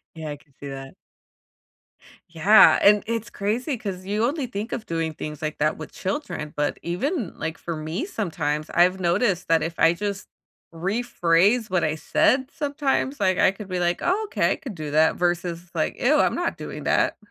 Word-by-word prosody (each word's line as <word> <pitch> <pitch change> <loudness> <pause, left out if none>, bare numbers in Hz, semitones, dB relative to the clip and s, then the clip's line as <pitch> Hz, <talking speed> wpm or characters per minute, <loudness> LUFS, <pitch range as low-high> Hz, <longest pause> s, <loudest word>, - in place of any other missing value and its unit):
Yeah, 160 -2 -6
I 145 - -5
can 145 -1 -26
see 140 - -8
that. 135 0 -8 1.4
Yeah, 195 +7 +7
and 205 0 +5
it's 230 -1 -3
crazy 230 +8 -2
'cause 190 -4 -6
you 210 +3 0
only 280 +1 0
think 220 -1 -5
of 220 - -4
doing 165 -1 -2
things 150 0 -7
like 155 0 -3
that 155 +1 +1
with 155 - -8
children, 185 - -4
but 145 0 -1
even, 220 - -2
like, 160 0 -4
for 170 - -5
me 155 - -3
sometimes, 155 - -3
I've 180 +2 +3
noticed 180 +1 +1
that 165 -1 +3
if 165 +1 -4
I 165 +1 +5
just 200 +2 -4 0.4
rephrase 195 +2 +1
what 180 -2 +1
I 155 0 0
said 260 - +2
sometimes, 285 -2 -1
like, 190 -3 +2
I - - +5
could 195 +2 -9
be 180 -1 -2
like, 175 0 0
"Oh, 400 +5 +1
okay, - - +1
I - - -2
could 260 - -8
do 155 -2 -5
that," 155 +1 +4
versus, 175 0 -2
like, 155 - -2
"Ew, 290 +5 +4
I'm - - +2
not - - -1
doing - - -7
that." - - +2
180 Hz, 190 wpm, -24 LUFS, 160-225 Hz, 1.4 s, Yeah